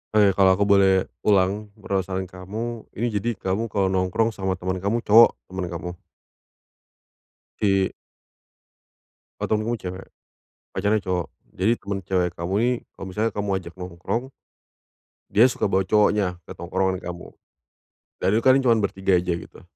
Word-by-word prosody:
Oke, 100 -2 +6
kalau 95 -1 +6
aku 100 - +1
boleh 100 -1 +6 0.4
ulang, 100 +1 +2
perasaan 95 -3 -2
kamu. 105 +6 -6
Ini 120 +3 -1
jadi 120 +4 -2
kamu 100 +4 -2
kalau 95 -2 0
nongkrong 95 +5 +1
sama 95 -2 -2
temen 95 +1 -3
kamu, 110 +5 -1
cowok 115 +3 +7 0.2
teman 95 -1 -3
kamu. 85 +1 -5 1.7
Di 95 -2 +3 1.5
Oh, - - -2
temenmu 110 +2 0
cewek? 95 -3 -7 0.7
Pacarnya 105 +3 +2
cowok? 90 -3 -2 0.3
Jadi 95 +5 +2
temen 100 -1 -4
cewek 90 -1 0
kamu 85 +3 -4
ini 120 +2 +2 0.3
kalau - - -7
misalnya 105 +4 -1
kamu 100 0 -3
ajak 85 0 -10
nongkrong, 90 +7 -3 1.1
dia 105 +4 +5
suka - - -1
bawa 95 0 +2
cowoknya? 105 -2 +2
Ke - - -7
tongkrongan 95 +2 -1
kamu. 90 0 -7 0.9
Dan - - +2
itu 115 - +1
kalian 130 +1 +6
cuman 115 -1 +4
bertiga 95 -1 +1
aja 90 0 -1
gitu? 85 - -9
95 Hz, 145 wpm, -24 LUFS, 95-105 Hz, 1.7 s, cowok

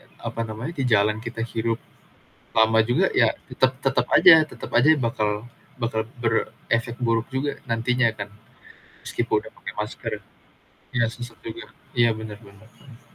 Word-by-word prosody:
e - - -22 0.3
apa 115 0 -5
namanya, 115 +9 -5
di 135 - +1
jalan 105 +1 +4
kita 115 0 -4
hirup 115 0 0 0.8
lama 110 0 +5
juga 120 - +3
ya, - - +6 0.2
tetep 130 0 +2
tetep 130 -2 +2
aja 165 - +10 0.2
tetep 120 - -9
aja 135 - +5 0.2
bakal 110 -2 0 0.5
bakal 115 -1 0 0.2
berefek 115 +1 -1
buruk 115 -1 +1
juga 140 +2 0 0.2
nantinya 120 +1 +2
kan. 100 0 -4 0.8
Meskipun - - -1
udah - - -12
pake - - -6
masker, - - -5 0.8
iya 120 - +3
sesak 120 -2 -9
juga, 110 - -6 0.3
iya 120 -1 +5
bener 110 -1 -7
bener 100 +2 -17
bener. 130 -5 -16
115 Hz, 150 wpm, -24 LUFS, 110-120 Hz, 0.8 s, aja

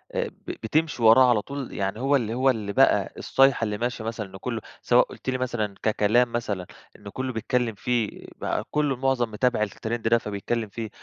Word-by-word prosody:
آآ - - 0
ب - - -17 0.2
بتمشي 150 +1 0
وراه 125 +3 +7
على 110 -3 +3
طول، 140 +2 -6
يعني 100 +2 -2
هو 140 +2 +2
اللي 115 -4 0
هو 130 +2 +3
اللي 105 -5 -1
بقى - - +3
الصيحة 135 -3 +3
اللي 105 -2 -1
ماشية 120 0 -3
مثلًا 110 -2 -4
إن 95 0 -11
كلّه 115 +2 -4 0.2
سواء - - +4
قلت - - -7
لي 130 - 0
مثلًا 120 -5 -2
ككلام 110 +3 +3
مثلًا 105 -6 -2 0.3
إنّه 100 - -11
كلّه 130 +2 -3
بيتكلّم 115 0 -1
فيه، 115 0 -2
بقى - - -2
كلّه 150 -3 +1
معظم 125 -3 0
متابع 125 +1 +1
الترند 110 +2 -3
ده 115 +1 +5
فبيتكلم 105 +1 -3
فيه، 110 +1 -5
115 Hz, 195 wpm, -25 LUFS, 105-130 Hz, 0.3 s, وراه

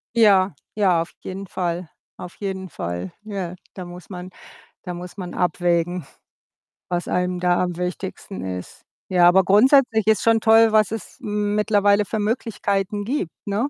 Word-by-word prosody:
Ja, 200 -5 +5 0.2
ja, 185 -5 +3
auf 170 - -6
jeden 190 +1 -6
Fall, 175 -2 -3 0.3
auf 180 - -9
jeden 190 -2 -4
Fall. 85 - -5
Ja, 195 -4 -5 0.2
da 185 -2 -7
muss 175 +2 -11
man 180 -1 -7 0.5
da 180 -2 -5
muss 180 +1 -8
man 180 -3 -6
abwägen, 175 -2 0 0.8
was 175 -1 -2
einem 180 0 0
da 175 0 +2
am 180 -2 -3
wichtigsten 185 +2 -5
ist. 90 -1 -7 0.3
Ja, 180 -2 +5
aber 190 +2 +6
grundsätzlich 220 +2 +4
ist 220 - +4
schon 225 -1 +3
toll, 225 0 +6
was 215 -2 +4
es 225 -1 -7
mittlerweile 210 -1 +2
für 220 - -3
Möglichkeiten 205 -2 -1
gibt, 245 - -2
ne? 210 +7 -1
190 Hz, 155 wpm, -22 LUFS, 175-210 Hz, 0.8 s, aber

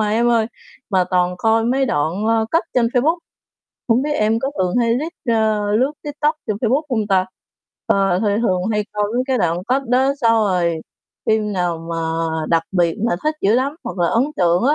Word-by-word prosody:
à 215 - +1
em 235 +3 +2
ơi, 230 -2 +3 0.4
mà 185 -2 +3
toàn 180 -1 +1
coi 225 +2 +2
mấy 265 +3 +1
đoạn, 165 - -1
ơ, 225 0 +2
cắt 330 - +2
trên 245 -2 +3
Facebook, 275 +8 +1 0.7
hổng 235 +2 +3
biết 300 +1 -1
em 220 -2 +1
có 270 +4 -2
thường 180 -1 0
hay 230 -1 +2
lít 310 +7 -3
a, 220 -2 +2 0.2
lướt 265 +4 +1
TikTok 295 +1 -1
trên 215 -3 -1
Facebook 250 +6 +1
hông 220 -4 0
ta? 190 -2 +2 0.6
Ờ, 195 -2 +2
thì 220 - 0 0.2
thường 185 -5 +1
hay 210 0 0
coi 210 0 0
mấy 250 - +2
cái 260 -2 +1
đoạn 170 -4 +1
cắt 265 +2 +2
đó 260 +3 +3
xong 230 -3 +4
rồi 175 -4 0 0.5
phim 215 -1 +1
nào 175 -3 -1
mà 165 - -2 0.5
đặc 165 -1 +2
biệt 175 -3 +2
mà 230 - +1
thích 310 +1 +1
dữ 205 +3 +3
lắm 265 +4 +1
hoặc - - -6
là 170 -1 +2
ấn 230 +3 +2
tượng 175 -1 +2
á 285 +3 +4
220 Hz, 210 wpm, -19 LUFS, 185-250 Hz, 0.7 s, xong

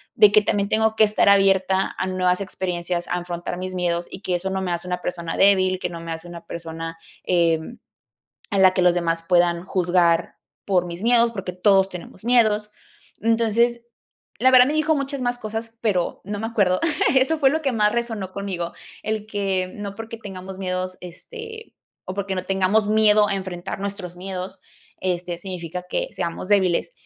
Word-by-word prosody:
de 210 -1 +7
que 215 - +7
también 200 -1 0
tengo 220 +1 +2
que 215 - +7
estar 210 -1 +3
abierta 195 -1 +3
a - - -1
nuevas 185 0 +1
experiencias, 175 -2 -3
a - - -3
afrontar 175 0 -4
mis 185 0 -5
miedos, 175 -1 -1
y - - -7
que 185 -3 -1
eso 185 +2 -2
no 190 0 -2
me 185 -2 -2
hace 175 +1 -4
una 180 0 -2
persona 170 -2 -4
débil, 185 -2 +4
que - - -2
no 170 -1 -7
me 165 0 -6
hace 165 +1 -6
una 170 -1 -10
persona, 165 0 -6 0.3
eh, 170 -2 +2 0.9
a 200 - 0
la 190 -1 +6
que 185 - +2
los 180 -1 +5
demás 165 -1 0
puedan 175 -1 +3
juzgar 175 -3 +2 0.3
por 180 -3 +1
mis 175 +2 -7
miedos, 235 0 +4
porque 195 -5 -5
todos 190 +1 +3
tenemos 180 +1 -10
miedos. 215 -3 +3 0.5
Entonces, 230 +1 +2 0.6
la 255 +3 +5
verdad, 250 -1 +8
me 290 - 0
dijo 310 +1 +2
muchas 275 -1 -3
más 245 0 -1
cosas, 225 +1 -5
pero 190 -6 0
no 205 +1 -5
me 225 - -2
acuerdo. 200 -5 +2 0.4
Eso 265 +5 +3
fue 275 -3 +4
lo 315 +2 0
que 275 -3 0
más 210 -3 +2
resonó 225 -5 -3
conmigo. 185 -3 -4 0.3
El 215 0 -3
que 195 -3 -1
no 200 -1 -6
porque 225 +1 -7
tengamos 190 -3 -8
miedos, 185 -1 -3
este, 450 - -10 0.3
o 185 - -5
porque 200 -1 -2
no 185 - -2
tengamos 195 +2 +2
miedo 215 -1 +5
a 200 - 0
enfrentar 185 -1 -5
nuestros 200 -3 -5
miedos, 185 +1 -6 0.4
este, 180 -1 -2
significa 180 -1 -6
que - - -1
seamos 170 0 -4
débiles. 190 - +2
190 Hz, 185 wpm, -23 LUFS, 180-215 Hz, 0.9 s, verdad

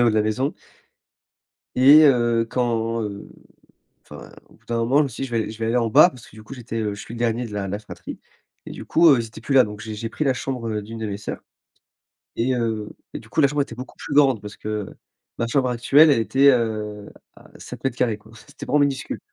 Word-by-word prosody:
le 120 - +5
haut - - +4
de - - -2
la 110 - +3
maison. 125 +6 -1 1.2
Et 145 +4 +8
heu, 120 -3 +2
quand, 115 -2 -1
heu, 100 -1 -6 0.7
enfin, - - -12 0.2
au - - -21
bout - - -30
d'un 115 - -2
moment 115 +5 +2
je 150 - +5
me - - -2
suis 120 - -8
dit, 135 - -2
je 120 - -14
vais 115 - 0
aller - - -6
je 110 - -12
vais 115 - -1
aller 115 - 0
en 115 -2 0
bas 175 - +7
parce 125 -8 -14
que - - -18
du 110 - -12
coup, 135 +6 -10
j'étais, 115 -2 -6
heu, 105 -1 -2
je 100 - -11
suis - - -10
le 120 - -7
dernier 120 +1 0
de 110 - -9
la 100 -1 -3
de - - -5
la 100 - -2
fratrie 105 0 -10 0.5
et - - -8
du - - -8
coup, 170 +1 +4
heu, 135 -5 +5
ils 115 - -3
étaient 110 - -13
plus 140 - -3
là. 130 -2 +7
Donc, 105 -2 -7
j'ai 110 0 -7
j'ai 115 +2 -5
pris 155 - -3
la 135 - +2
chambre, 125 -2 -4
heu, 105 -1 -2
d'une 115 +2 -9
de 110 - -4
mes 100 -1 -4
sœurs 105 - -6 1.0
et 125 +2 +1
heu, 110 -3 -2 0.3
et - - -5
du 115 - -16
coup, 155 - 0
la 140 - +4
chambre 145 -1 0
était 120 - -11
beaucoup 125 +2 -10
plus - - -6
grande, 135 -7 +4
parce 105 -1 -9
que 105 -2 -4 0.5
ma 115 - -1
chambre 130 +1 +1
actuelle, 135 +6 +5
elle 140 - +4
était, 130 +6 +3
heu, 105 -4 -2 0.3
à - - -18
7 - - -10
mètres 130 -2 -2
carrés 115 -4 0
quoi, 110 +1 -20
c 105 - -16
c'était - - -10
vraiment 150 - +2
minuscule. 140 -2 -1
115 Hz, 275 wpm, -22 LUFS, 110-130 Hz, 1.2 s, Et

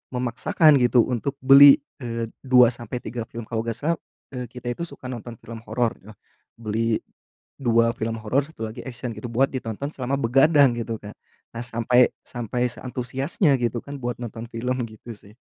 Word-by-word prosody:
memaksakan, 140 - +3
gitu, 120 -1 +4
untuk 130 +3 -2
beli, 140 +1 +10 0.2
eee, 115 -2 -4
2 125 -2 +5
sampai 120 +1 -7
3 115 -2 -5
film. 115 0 -7
Kalau 110 -1 -2
gak 115 -1 -3
salah, 165 +6 0 0.4
eee, 125 -1 -4
kita 125 -1 -9
itu 170 - -5
suka 130 - -10
nonton 120 -1 -7
film 115 0 -9
horor, 120 -2 0
yoh. 105 0 -13 0.4
Beli 115 0 0 0.6
2 115 -2 +3
film 115 0 -2
horor, 130 +6 +1
1 115 -8 -7
lagi 110 - -8
action, 120 -1 -5
gitu, 110 +4 -7
buat 130 +4 +3
ditonton 130 +2 -4
selama 130 +1 -2
begadang, 140 +2 +5
gitu, 115 -1 -3
Kak. 105 0 -10 0.4
Nah, 115 - -4
sampai 120 +1 +3 0.2
sampai 120 +1 -2
seantusiasnya, 130 - -1
gitu 120 -1 0
kan, 140 -1 -8
buat 120 -1 -2
nonton 115 0 -7
film, 125 +2 -2
gitu 110 +2 -11
sih. 105 +2 -19
120 Hz, 175 wpm, -24 LUFS, 115-130 Hz, 0.6 s, beli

